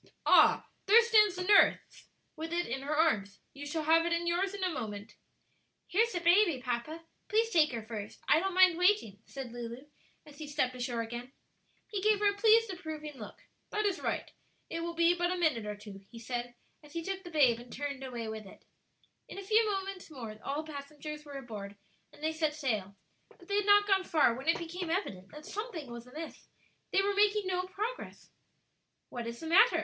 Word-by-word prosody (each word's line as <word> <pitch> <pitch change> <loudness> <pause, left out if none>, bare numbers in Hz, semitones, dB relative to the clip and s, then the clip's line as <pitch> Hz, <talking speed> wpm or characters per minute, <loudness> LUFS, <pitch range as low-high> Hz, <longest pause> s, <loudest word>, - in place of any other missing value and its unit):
"Ah, - - +5 0.2
there 430 +4 +8
stands 425 -4 +5
the 365 - -3
nurse 405 +2 +3 0.3
with 320 0 -6
it 345 +1 0
in 265 +3 -4
her 290 +2 -2
arms. 205 -11 +1
You 285 +1 -8
shall 315 +2 -2
have 325 +2 +4
it 340 - -1
in 340 0 0
yours 370 +3 0
in 395 - -4
a 370 - +1
moment." 210 -6 -6 0.7
"Here's 455 +5 +2
the 350 - -1
baby, 345 -3 +4
papa; 250 +6 -4 0.3
please 450 +2 +2
take 315 -5 +4
her 230 -3 -5
first; 215 -2 -7
I 305 - +5
don't 380 +1 -2
mind 370 -2 +6
waiting," 360 - +2
said 270 -3 -7
Lulu, 240 +2 -7 0.4
as 295 -1 -15
he 305 - -6
stepped 285 -3 0
ashore 245 -2 -3
again. 240 +3 -7 0.6
He 405 -3 -3
gave 425 +1 +4
her 410 0 +3
a - - -9
pleased, 445 +1 +4
approving 310 -4 -7
look. 210 - -10 0.3
"That 425 0 -1
is 395 -3 0
right; - - -2 0.4
it 330 - -3
will 340 0 -4
be 335 +1 +4
but 350 0 0
a 365 - -1
minute 295 -11 +1
or 210 - -3
two," 205 -1 -11
he 235 - -12
said, 240 +1 -5 0.3
as 295 -1 -17
he 335 -1 -3
took 385 +2 -4
the 350 - -9
babe 265 -8 +4
and 240 0 -13
turned 280 -1 -5
away 240 -3 -5
with 220 -2 -6
it. - - -16 0.6
In - - -10
a 395 - -6
few 435 +3 +4 0.2
minutes 390 -3 -8
more, 235 -8 -8
all 285 +3 -2
the 310 -1 -10
passengers 300 +2 -8
were 285 -1 -8
aboard, 210 -6 -8 0.4
and 295 - -17
they 315 0 0
set 310 -2 0
sail; 215 -10 -2 0.4
but 350 - -18
they 405 - 0
had 410 0 0
not 410 0 +6
gone 390 -2 +3
far 310 -9 +3
when 265 +5 -8
it 330 - +4
became 340 +1 -5
evident 205 - -3
that 300 0 -12
something 380 - -6
was 235 0 -9
amiss; 310 +5 -9 0.4
they 390 - +3
were 405 0 +1
making 410 0 +3
no 365 0 -1
progress. 435 +6 -6 0.8
"What 240 -2 -5
is 235 0 -6
the - - -6
matter?" 380 +9 +5
315 Hz, 210 wpm, -31 LUFS, 245-375 Hz, 0.8 s, there